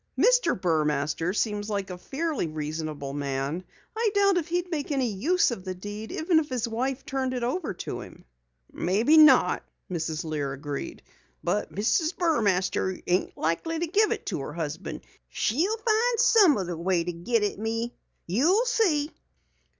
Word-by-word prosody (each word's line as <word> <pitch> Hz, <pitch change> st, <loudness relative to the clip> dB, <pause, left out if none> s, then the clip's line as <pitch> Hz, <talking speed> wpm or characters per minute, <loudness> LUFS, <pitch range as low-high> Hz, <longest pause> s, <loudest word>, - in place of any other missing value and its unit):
"Mr. -, -, +3 dB
Burmaster 155 Hz, -1 st, 0 dB
seems 210 Hz, 0 st, -1 dB
like 200 Hz, -2 st, -2 dB
a 180 Hz, -, -6 dB
fairly 300 Hz, -, -2 dB
reasonable 155 Hz, -2 st, -4 dB
man. 140 Hz, +4 st, -2 dB, 0.3 s
I 450 Hz, 0 st, +2 dB
doubt 395 Hz, -3 st, +4 dB
he'd 350 Hz, +1 st, -2 dB
make 300 Hz, -2 st, -2 dB
any 270 Hz, -3 st, +1 dB
use 300 Hz, -, +2 dB
of 195 Hz, -6 st, -5 dB
the 185 Hz, -1 st, -4 dB
deed 205 Hz, +4 st, -7 dB
even 325 Hz, 0 st, +2 dB
if 300 Hz, -, -4 dB
his 250 Hz, -3 st, -1 dB
wife 255 Hz, +4 st, -2 dB
turned 265 Hz, -2 st, -2 dB
it 245 Hz, -, -2 dB
over 255 Hz, -, -2 dB
to -, -, -4 dB
him." -, -, -13 dB, 0.5 s
"Maybe 220 Hz, -, +2 dB
not," 285 Hz, -11 st, +6 dB, 0.3 s
Mrs. 160 Hz, -2 st, -2 dB
Lear 150 Hz, -4 st, -2 dB
agreed, 140 Hz, 0 st, -6 dB, 0.4 s
"but 210 Hz, -, -1 dB
Mrs. 310 Hz, -, +1 dB
Burmaster 200 Hz, -, +1 dB
ain't 180 Hz, +1 st, 0 dB
likely 170 Hz, -, -1 dB
to 340 Hz, -, 0 dB
give 420 Hz, +6 st, +2 dB
it 450 Hz, -, -3 dB
to 180 Hz, -, -2 dB
her 140 Hz, -, -6 dB
husband. 165 Hz, +2 st, -5 dB, 0.3 s
She'll 350 Hz, -, 0 dB
find 460 Hz, +2 st, +2 dB
some 400 Hz, -, +6 dB
other 180 Hz, -3 st, -3 dB
way 175 Hz, 0 st, +1 dB
to 175 Hz, +1 st, -3 dB
git 210 Hz, +7 st, 0 dB
at 205 Hz, -, -1 dB
me. 225 Hz, +2 st, -2 dB, 0.3 s
You 315 Hz, -, +3 dB
see!" 340 Hz, -12 st, +2 dB
220 Hz, 160 wpm, -27 LUFS, -, 0.5 s, not